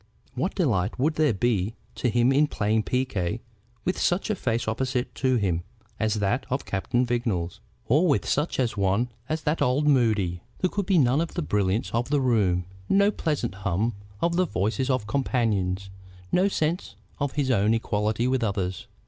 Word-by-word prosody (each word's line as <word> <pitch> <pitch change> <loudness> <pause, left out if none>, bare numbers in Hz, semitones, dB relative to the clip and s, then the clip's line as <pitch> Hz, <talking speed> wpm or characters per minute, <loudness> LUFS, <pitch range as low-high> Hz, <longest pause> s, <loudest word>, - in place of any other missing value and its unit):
What 150 +9 -2
delight 110 - +1
would 150 +5 +2
there 155 -2 +3
be 110 -1 0 0.2
to 125 - 0
him 120 +2 +3
in 145 +3 +4
playing 110 -3 +1
piquet 115 -6 -1 0.5
with 185 - 0
such 185 +5 +1
a - - 0
face 120 - -1
opposite 125 +2 -1
to 130 -1 +1
him 95 -7 +1 0.4
as 110 0 +1
that 105 +5 0
of 130 +2 -2
Captain 120 +6 0
Vignolles, 105 -7 -1 0.3
or 150 +9 +3
with 145 - +1
such 150 +4 0
a 130 - +3
one 100 +3 0 0.2
as 155 0 -2
that 150 +2 0
of - - +4
old 135 +4 +1
Moody? 110 - +2 0.2
There 185 - 0
could 200 -3 -2
be 190 - +4
none 135 0 +4
of 170 - -4
the 175 - -1
brilliance 100 -4 0
of 120 +3 -1
the 145 0 +2
room, 100 -9 +2 0.2
no 200 +1 +4
pleasant 150 - -2
hum 100 +3 -1 0.3
of 170 0 +1
the 185 - +3
voices 115 - -1
of 130 -5 +1
companions, 105 -7 0 0.4
no 185 +2 +4
sense 160 - -1 0.2
of 145 -1 -1
his 140 -3 0
own 110 -1 +3
equality 110 +1 0
with 130 -1 +1
others. 95 -4 -2
120 Hz, 180 wpm, -26 LUFS, 105-145 Hz, 0.5 s, in